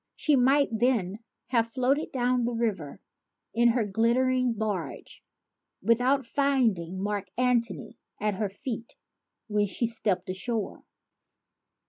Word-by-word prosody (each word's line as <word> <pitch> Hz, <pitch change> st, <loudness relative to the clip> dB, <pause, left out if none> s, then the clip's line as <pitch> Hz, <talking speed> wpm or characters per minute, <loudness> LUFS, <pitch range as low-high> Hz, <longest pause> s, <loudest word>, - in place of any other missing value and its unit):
She 300 Hz, -, +2 dB
might 275 Hz, +3 st, +4 dB
then 220 Hz, -4 st, +1 dB, 0.3 s
have 230 Hz, -2 st, +2 dB
floated 265 Hz, +5 st, 0 dB
down 250 Hz, -1 st, +1 dB
the 240 Hz, 0 st, -1 dB
river 205 Hz, -11 st, -2 dB, 0.5 s
in 235 Hz, +1 st, +4 dB
her 235 Hz, -1 st, +2 dB
glittering 245 Hz, +4 st, +2 dB
barge 210 Hz, -5 st, -4 dB, 0.6 s
without 250 Hz, +3 st, +2 dB
finding 225 Hz, -10 st, +1 dB
Mark 205 Hz, -2 st, -2 dB
Antony 240 Hz, -4 st, 0 dB, 0.2 s
at 210 Hz, 0 st, 0 dB
her 200 Hz, +1 st, -2 dB
feet 225 Hz, +3 st, -6 dB, 0.5 s
when 210 Hz, -1 st, +1 dB
she 220 Hz, +5 st, 0 dB
stepped 215 Hz, -5 st, -1 dB
ashore. 210 Hz, +3 st, -3 dB
230 Hz, 115 wpm, -28 LUFS, 205-255 Hz, 0.6 s, might